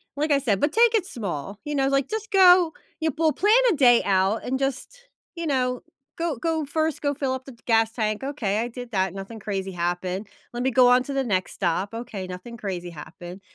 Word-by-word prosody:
like 300 +1 -1
I 280 - +5
said, 225 -8 0
but 295 +1 +1
take 465 +2 +4
it 425 -5 +2
small, 200 - -5
you 295 - -3
know? 270 -1 +1
Like, 275 0 +1
just 440 +1 -4
go 360 -3 +6 0.3
you 320 -1 +1
pull 315 +2 +1
plan 415 +2 +3 0.2
a - - +1
day 245 -5 +5
out 195 +2 +1
and 260 +1 -2
just 280 - -4 0.3
you 335 -2 -4
know, 250 -3 0 0.4
go 335 -3 -1
go 320 +2 -1
1st 315 +1 -1
go 285 -1 0
fill 275 -2 -2
up 260 0 -6
the 270 - -10
gas 225 -1 +3
tank, 215 -2 -1
okay 230 -8 -1
I 235 - -1
did 245 0 -9
that, 190 -3 0
nothing 195 +3 -8
crazy 195 -2 -4
happened. 180 +3 -3 0.3
Let 240 - -3
me 265 - +1
go 250 0 +6
on 250 +1 +5
to 280 - -6
the 270 0 0
next 190 -6 -1
stop 190 +2 -1
okay, 225 -5 -6
nothing 185 +6 -8
crazy 185 -5 -5
happened 175 +3 -10
245 Hz, 220 wpm, -24 LUFS, 195-290 Hz, 0.4 s, go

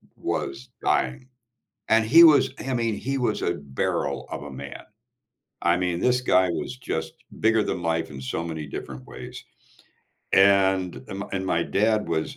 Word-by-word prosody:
was 70 -1 -4
dying. 65 - 0 0.6
And 110 0 +4
he 165 +10 +8
was 145 -4 +6
I 130 -1 -3
mean, 115 -3 0
he 135 +1 -2
was 120 -4 -1
a 85 - 0
barrel 70 -5 -2
of - - -5
a 70 - -8
man. 65 - -8 0.8
I 85 0 +3
mean, 90 -1 -1
this 125 0 +2
guy 95 -7 +3
was 120 +8 -4
just 80 -10 -4 0.3
bigger 110 -1 +3
than 90 - -3
life 80 -1 -1
in 65 - -8
so 65 +5 -3
many 80 -2 -5
different 65 -2 -7
ways. - - -9 0.9
And 95 -6 +3
m 100 +1 -5
and 95 -1 -2
my 85 -2 +1
dad 105 +1 +1
was 80 - -2
95 Hz, 165 wpm, -25 LUFS, 80-115 Hz, 0.9 s, he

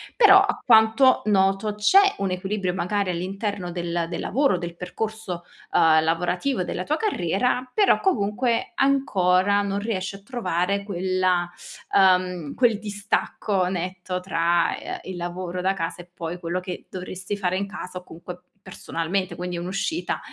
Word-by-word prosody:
Però 395 -4 +8
a 405 +1 -1
quanto 225 +3 +5
noto 195 0 +2
c'è 390 - +5
un 195 -1 -1
equilibrio 185 0 -2
magari 190 +1 -1
all'interno 190 +1 -3
del 170 -1 -2
del 175 - -4
lavoro, 270 -5 +1
del 170 -1 -6
percorso, 185 0 -5 0.3
ehm, 160 -1 +5
lavorativo 180 +8 0
della 180 - -4
tua 300 - 0
carriera, 250 - 0
però 415 -2 +3
comunque 230 - 0
ancora 200 -8 +2
non 200 0 -2
riesci 200 -2 -3
a 195 - -13
trovare 200 -5 -1
quella 185 -2 0 0.5
uhm, 180 -4 +3
quel 235 -5 +3
distacco 205 -2 -1
netto 180 0 -3
tra, 170 -2 +1
ehm, - - -6
il 185 -1 -7
lavoro 175 +1 -4
da 190 +1 +1
casa 175 -2 -4
e 175 - -17
poi 170 0 -6
quello 175 +1 -2
che 180 0 -7
dovresti 185 +2 -5
fare 185 -2 0
in 200 +1 -2
casa 180 -2 -7
o - - -18
comunque 175 +1 -10 0.3
personalmente, 185 +1 -3
quindi 180 0 -4
un'uscita 195 - -2
185 Hz, 150 wpm, -24 LUFS, 180-210 Hz, 0.5 s, Però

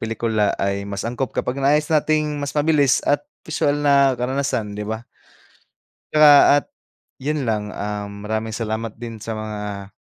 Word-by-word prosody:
pelikula 110 -2 0
ay 100 0 -2
mas 100 +1 -4
angkop 120 +2 -3
kapag 130 +2 -2
nais 150 +2 +3
nating 150 -1 +1
mas 145 +1 -4
mabilis 145 -3 +3
at 145 0 +2 0.2
bisual 145 -2 0
na 140 -2 +3
karanasan 125 -4 -2
di 105 0 -5
ba? 110 +2 -4 1.1
'Tsaka 150 -1 +8 0.2
at - - -2 0.6
yun 145 -1 -1
lang, 105 -2 -1
um, 100 0 -5
maraming 110 +1 -2
salamat 110 0 -4
din 115 -2 -8
sa 115 -1 -5
mga 105 -2 -6
115 Hz, 150 wpm, -21 LUFS, 105-145 Hz, 1.1 s, Tsaka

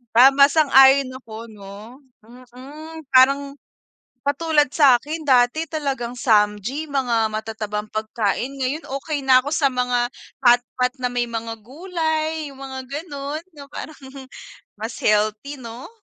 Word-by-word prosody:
Tama 270 +3 +7
sang-ayon 270 -3 +5
ako 225 0 -10
no, 210 +5 -12 0.6
mm, 310 +5 -10
parang 275 +2 +4 0.7
katulad 295 0 +2
sakin 290 +3 +2
dati 255 +3 +3
talagang 275 -6 -4
samgy 215 +6 +1
mga 240 -6 0
matatabang 215 -1 -5
pagkain, 215 +4 -2
ngayon 275 +5 -2 0.2
okey 295 -3 -4
na 260 -1 +6
ako 280 - -5
sa 300 - +1
mga 250 -1 0 0.3
hotpot 245 +1 +3
na 250 - 0
may 245 0 -1
mga 230 -1 -5
gulay 315 - -3
'yung 270 - -15
mga 265 -1 -7
ganun, 290 0 -5 0.2
na 280 - -10
parang 310 - -8 0.8
mas 225 +2 -5
healthy 215 +7 0
no? 235 - -9
260 Hz, 125 wpm, -21 LUFS, 230-290 Hz, 0.8 s, Tama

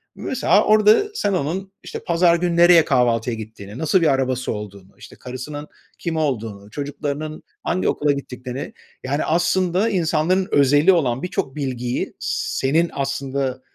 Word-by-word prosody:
Mesela, - - +2
orada 215 - +5
sen 205 - 0
onun, 185 +4 -2
işte, - - -6
pazar 170 0 +3
günü 175 0 0
nereye 175 -2 +7
kahvaltıya 120 -3 +1
gittiğini, 110 -1 -9
nasıl 160 +5 +2
bir 165 - +3
arabası 130 -2 0
olduğunu, 100 -2 -9
işte, - - -13
karısının 145 +4 -7 0.3
kim 165 -2 -3
olduğunu, 110 -9 -3
çocuklarının 145 +2 -5 0.2
hangi 185 - 0
okula 145 -1 +1
gittiklerine, 130 -1 -6 0.3
yani, 140 +3 -1
aslında 180 +4 +1
insanların 180 0 +1
özeli 145 +5 +5
olan 130 -6 0
birçok 180 -6 -3
bilgiyi, 125 -4 -3
senin 160 +6 0
aslında 135 -1 -2
145 Hz, 135 wpm, -21 LUFS, 130-170 Hz, 0.3 s, nereye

